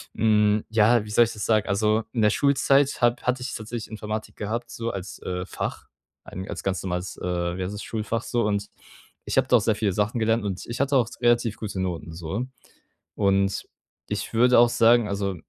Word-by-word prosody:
Hm, 105 Hz, -1 st, +3 dB
ja, 110 Hz, +1 st, +4 dB
wie 105 Hz, -, -10 dB
soll 110 Hz, +3 st, +5 dB
ich 115 Hz, -, -6 dB
das 105 Hz, -2 st, -4 dB
sagen? 110 Hz, -3 st, +2 dB
Also, 105 Hz, +2 st, +1 dB
in 115 Hz, -, -1 dB
der 105 Hz, -, +5 dB
Schulzeit 140 Hz, +3 st, +2 dB
habe 120 Hz, 0 st, +3 dB
hatte 125 Hz, 0 st, 0 dB
ich 125 Hz, 0 st, -4 dB
tatsächlich 110 Hz, 0 st, -6 dB
Informatik 110 Hz, 0 st, -5 dB
gehabt 110 Hz, +3 st, -4 dB
so 115 Hz, 0 st, -4 dB
als, 95 Hz, 0 st, -7 dB
äh, 90 Hz, 0 st, -4 dB
Fach -, -, -5 dB, 0.4 s
ein 95 Hz, +2 st, -8 dB
als -, -, -5 dB
ganz 95 Hz, -1 st, -2 dB
normales, 90 Hz, -1 st, -4 dB
äh, 85 Hz, -1 st, -2 dB
wie 95 Hz, -, -2 dB
heißt 95 Hz, +3 st, -4 dB
es, 105 Hz, -, -6 dB
Schulfach 115 Hz, +1 st, -3 dB
so. 120 Hz, -2 st, 0 dB
Und 100 Hz, -1 st, -1 dB, 0.6 s
ich -, -, -3 dB
habe -, -, +4 dB
da -, -, +4 dB
auch -, -, +5 dB
sehr -, -, +1 dB
viele 105 Hz, -3 st, 0 dB
Sachen 105 Hz, +5 st, -1 dB
gelernt, 115 Hz, 0 st, +1 dB
und 95 Hz, -2 st, -4 dB
ich 120 Hz, +1 st, -5 dB
hatte 140 Hz, +1 st, +1 dB
auch 120 Hz, -3 st, +2 dB
relativ 120 Hz, -2 st, +2 dB
gute 105 Hz, -3 st, -5 dB
Noten 85 Hz, -3 st, -4 dB
so. 90 Hz, +8 st, -4 dB, 0.7 s
Und 100 Hz, -1 st, +1 dB, 0.4 s
ich -, -, -4 dB
würde 125 Hz, +2 st, +5 dB
auch 120 Hz, 0 st, +6 dB
sagen, 115 Hz, -1 st, +4 dB
also, 100 Hz, -1 st, -2 dB
110 Hz, 210 wpm, -25 LUFS, 100-115 Hz, 0.7 s, auch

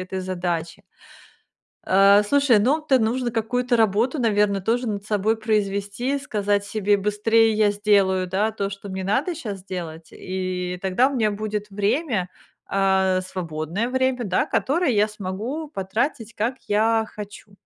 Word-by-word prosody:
этой 185 Hz, +1 st, -5 dB
задаче. 175 Hz, -3 st, -3 dB, 1.0 s
А, 200 Hz, +2 st, +5 dB
слушай, 275 Hz, 0 st, +3 dB
ну 270 Hz, +9 st, +2 dB
это 270 Hz, -4 st, +4 dB
нужно 240 Hz, +2 st, 0 dB
какую-то 240 Hz, +2 st, 0 dB
работу, 225 Hz, +6 st, +2 dB
наверное, 205 Hz, -4 st, +2 dB
тоже 235 Hz, +5 st, 0 dB
над 205 Hz, -1 st, -4 dB
собой 215 Hz, +1 st, 0 dB
произвести, 215 Hz, +4 st, -1 dB
сказать 205 Hz, -7 st, -1 dB
себе: 205 Hz, 0 st, +1 dB
"Быстрее 215 Hz, +3 st, +2 dB
я 215 Hz, -1 st, +3 dB
сделаю, 200 Hz, -3 st, +2 dB
да, 195 Hz, +4 st, 0 dB
то, 200 Hz, -2 st, -3 dB
что 200 Hz, 0 st, -8 dB
мне 190 Hz, -1 st, -4 dB
надо 265 Hz, -, 0 dB
сейчас 210 Hz, -, -6 dB
сделать, 170 Hz, -4 st, -7 dB
и 185 Hz, -1 st, -4 dB
тогда 195 Hz, +7 st, +3 dB
у 280 Hz, -, -5 dB
меня 220 Hz, -4 st, +1 dB
будет 210 Hz, 0 st, -4 dB
время, 205 Hz, -, 0 dB, 0.4 s
а, 190 Hz, -1 st, +2 dB
свободное 175 Hz, +3 st, -4 dB
время, 260 Hz, -1 st, 0 dB
да, 185 Hz, -2 st, +1 dB
которое 305 Hz, +2 st, +1 dB
я 210 Hz, 0 st, +3 dB
смогу 215 Hz, +10 st, -5 dB
потратить, 225 Hz, +2 st, -3 dB
как 235 Hz, +5 st, -1 dB
я 220 Hz, +2 st, +2 dB
хочу", 205 Hz, 0 st, -10 dB
210 Hz, 145 wpm, -23 LUFS, 190-230 Hz, 1.0 s, А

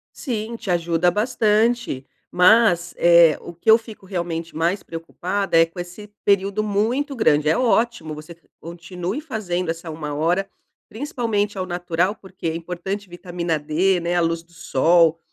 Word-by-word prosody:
Sim, 235 Hz, -4 st, -4 dB
te 230 Hz, -5 st, -4 dB
ajuda 170 Hz, 0 st, +2 dB
bastante. 220 Hz, -, +1 dB, 0.3 s
Mas, 180 Hz, -2 st, +4 dB
eh, 170 Hz, -2 st, +6 dB
o 170 Hz, -, -9 dB
que 175 Hz, -, -3 dB
eu 220 Hz, -, +8 dB
fico 225 Hz, -4 st, -13 dB
realmente 170 Hz, -3 st, -4 dB
mais 170 Hz, +5 st, 0 dB
preocupada 175 Hz, +3 st, -2 dB
é 165 Hz, -, +7 dB
com 165 Hz, +2 st, -12 dB
esse 180 Hz, +4 st, -8 dB
período 200 Hz, +1 st, +2 dB
muito 230 Hz, +8 st, -1 dB
grande. 150 Hz, -, +2 dB
É 155 Hz, -, +3 dB
ótimo, 230 Hz, -9 st, +1 dB
você 155 Hz, +3 st, -10 dB, 0.2 s
continue 175 Hz, -, -6 dB
fazendo 185 Hz, -, -3 dB
essa 165 Hz, 0 st, -4 dB
1 155 Hz, -2 st, -5 dB
hora, 175 Hz, +6 st, 0 dB, 0.4 s
principalmente 220 Hz, -5 st, -2 dB
ao 185 Hz, -, -2 dB
natural, 175 Hz, +2 st, -1 dB
porque 190 Hz, -4 st, -8 dB
é 160 Hz, -, -1 dB
importante 180 Hz, +4 st, -5 dB
vitamina 175 Hz, -2 st, -3 dB
D, 165 Hz, +6 st, +1 dB
né, 170 Hz, +1 st, -1 dB
a 175 Hz, -, +3 dB
luz 165 Hz, 0 st, -1 dB
do 170 Hz, -, -29 dB
sol. 165 Hz, +1 st, +3 dB
180 Hz, 155 wpm, -22 LUFS, 165-210 Hz, 0.4 s, eu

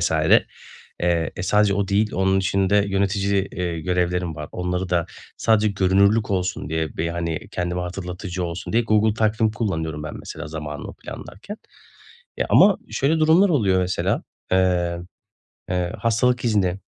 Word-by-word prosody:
vs. -, -, +1 dB, 0.9 s
Eee, 85 Hz, -1 st, +1 dB
e, 100 Hz, -, -4 dB
sadece 105 Hz, +1 st, +3 dB
o 100 Hz, -1 st, -1 dB
değil, 105 Hz, +2 st, +1 dB
onun 95 Hz, +1 st, +2 dB
içinde 95 Hz, +1 st, +1 dB
yönetici, 100 Hz, 0 st, 0 dB
eee, 85 Hz, -3 st, -3 dB
görevlerim 90 Hz, 0 st, -1 dB
var. 75 Hz, 0 st, -6 dB
Onları 90 Hz, +1 st, -2 dB
da 85 Hz, -2 st, +1 dB, 0.3 s
sadece 110 Hz, -1 st, +3 dB
görünürlük 100 Hz, +2 st, +2 dB
olsun 90 Hz, -5 st, -2 dB
diye 80 Hz, 0 st, -2 dB
bir, 85 Hz, +1 st, -1 dB
hani, 85 Hz, -1 st, -3 dB
kendime 90 Hz, 0 st, -2 dB
hatırlatıcı 90 Hz, 0 st, -5 dB
olsun 85 Hz, +1 st, -5 dB
diye 115 Hz, +2 st, +3 dB
Google 110 Hz, -1 st, +2 dB
Takvim 110 Hz, 0 st, +1 dB
kullanıyorum 80 Hz, -9 st, -3 dB
ben 75 Hz, -, -6 dB
mesela -, -, -8 dB
zamanımı 75 Hz, -2 st, -6 dB
planlarken. 200 Hz, -, -9 dB, 0.8 s
Ya -, -, -1 dB
ama 200 Hz, -1 st, +6 dB
şöyle 155 Hz, +4 st, +1 dB
durumlar 165 Hz, +6 st, +5 dB
oluyor 100 Hz, -, +2 dB
mesela, 90 Hz, 0 st, -1 dB, 0.3 s
eee, 90 Hz, -2 st, +2 dB, 0.7 s
eee, 90 Hz, +2 st, -1 dB
hastalık 120 Hz, +3 st, +1 dB
izni, 100 Hz, -4 st, +1 dB
95 Hz, 145 wpm, -22 LUFS, 90-105 Hz, 0.9 s, ama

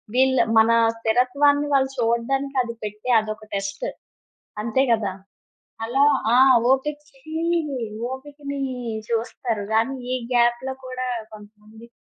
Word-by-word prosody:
వీళ్ళ 260 Hz, +1 st, +4 dB, 0.2 s
మన 225 Hz, +1 st, +6 dB, 0.3 s
స్థిరత్వాన్ని 280 Hz, +6 st, +2 dB
వాళ్ళు 265 Hz, -1 st, +3 dB
చూడడానికి 270 Hz, +4 st, 0 dB
అది 235 Hz, -1 st, -4 dB
పెట్టే 210 Hz, +4 st, -6 dB
అదొక 215 Hz, 0 st, -6 dB
టెస్ట్. 195 Hz, 0 st, -3 dB, 0.8 s
"అంతే 235 Hz, +4 st, +1 dB
కదా? 210 Hz, -4 st, 0 dB, 0.7 s
అలా 270 Hz, +5 st, +3 dB, 0.3 s
ఆ! -, -, +5 dB, 0.4 s
ఓపిక్కి 290 Hz, 0 st, -2 dB, 0.9 s
ఓపికని 280 Hz, +1 st, -6 dB, 0.5 s
చూస్తారు. 230 Hz, -1 st, -2 dB
గానీ 230 Hz, +5 st, +2 dB, 0.2 s
ఈ -, -, +1 dB, 0.2 s
గ్యాప్‌లో 240 Hz, +2 st, +2 dB
కూడా 255 Hz, 0 st, -4 dB, 0.3 s
కొంతమంది 215 Hz, +2 st, -14 dB
245 Hz, 105 wpm, -23 LUFS, 220-270 Hz, 0.9 s, మన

